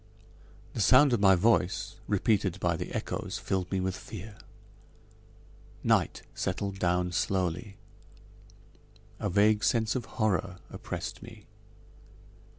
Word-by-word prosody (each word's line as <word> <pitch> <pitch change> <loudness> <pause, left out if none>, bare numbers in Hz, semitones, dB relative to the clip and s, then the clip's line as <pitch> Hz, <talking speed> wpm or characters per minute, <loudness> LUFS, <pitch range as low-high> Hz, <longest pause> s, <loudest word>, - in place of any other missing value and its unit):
The 115 - -2
sound 130 +5 +6
of 120 - +2
my 95 -1 +6
voice, 100 0 +1
repeated 100 -2 +1
by 85 -2 +1
the - - -5
echoes, - - -3
filled 95 -2 -2
me 95 - 0
with 95 0 -1
fear. 105 +1 -9 1.5
Night - - +1
settled 95 +1 -3
down 90 0 +1
slowly. 95 +1 -1 1.4
A - - -1
vague 105 +3 +3
sense 110 -1 +2
of 125 -3 -2
horror 95 -4 0
oppressed - - -6
me. - - -12
100 Hz, 115 wpm, -29 LUFS, 90-110 Hz, 1.5 s, sound